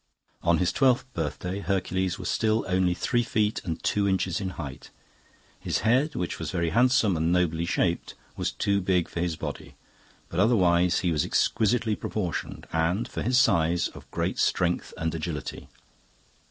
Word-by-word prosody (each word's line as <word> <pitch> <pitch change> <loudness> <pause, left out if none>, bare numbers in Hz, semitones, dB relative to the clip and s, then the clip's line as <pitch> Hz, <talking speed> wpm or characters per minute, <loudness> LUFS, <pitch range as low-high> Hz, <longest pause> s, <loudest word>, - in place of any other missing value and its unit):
"On 85 -1 +3
his 90 - +1
twelfth 130 -3 +3
birthday 90 +3 -3
Hercules 95 -1 -1
was - - -5
still 110 0 +1
only 90 -1 +2
three 120 +6 +1
feet 110 -2 0
and 80 -3 -4
two 100 -1 +1
inches 95 0 0
in 95 - -2
height. 70 -5 -7 0.7
His - - -1
head, 130 +8 +2
which 90 - -3
was - - -4
very 85 -2 -1
handsome 120 -3 +3
and 80 +1 +1
nobly 85 -2 +1
shaped, 85 0 0 0.2
was - - -2
too 100 0 0
big 90 -2 +1
for - - -6
his 85 -1 -1
body, 80 - -7 0.5
but 85 - -4
otherwise 90 -5 +3
he 90 - +1
was 75 -3 +1
exquisitely 110 0 +1
proportioned, 95 -6 -4
and, 85 +6 +1
for - - -5
his 125 +3 +2
size, 85 -8 +3
of - - -14
great - - -2
strength 90 -1 +1
and 80 0 -2
agility. 80 -2 -5
90 Hz, 165 wpm, -27 LUFS, 85-105 Hz, 0.7 s, On